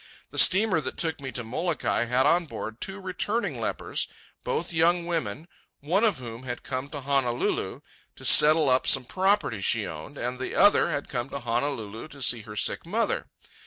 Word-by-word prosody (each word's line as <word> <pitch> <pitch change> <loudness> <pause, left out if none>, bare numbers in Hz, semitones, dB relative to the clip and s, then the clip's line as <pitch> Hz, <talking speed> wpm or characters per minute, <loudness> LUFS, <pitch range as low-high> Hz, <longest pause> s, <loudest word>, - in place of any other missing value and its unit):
The - - -1
steamer 190 -3 +5
that 130 -2 -5
took 160 -3 -1
me 135 -2 -5
to 125 - -4
Molokai 135 +1 -1
had 125 +2 +2
on 170 0 +3
board 110 -5 -7
two 195 +1 -4
returning 195 +5 -2
lepers, - - -2 0.4
both 460 - -2
young 170 +1 +2
women, 160 -4 -3 0.3
one 175 +9 0
of 215 -8 +2
whom 120 -2 -8
had 125 -2 -6
come 130 +1 -4
to 145 -1 -6
Honolulu 130 -3 -1 0.3
to - - -10
settle 155 0 +7
up 130 0 +2
some 135 -2 +4
property 190 - 0
she 110 +2 +1
owned, 80 - -8
and 125 +1 -4
the 130 - -4
other 205 -3 +5
had 145 -3 -3
come 125 0 -4
to 140 - -5
Honolulu 115 -1 -3
to 140 -2 -13
see 120 -1 +3
her 105 -1 -10
sick - - 0
mother. 220 +7 -1
140 Hz, 185 wpm, -26 LUFS, 120-175 Hz, 0.4 s, settle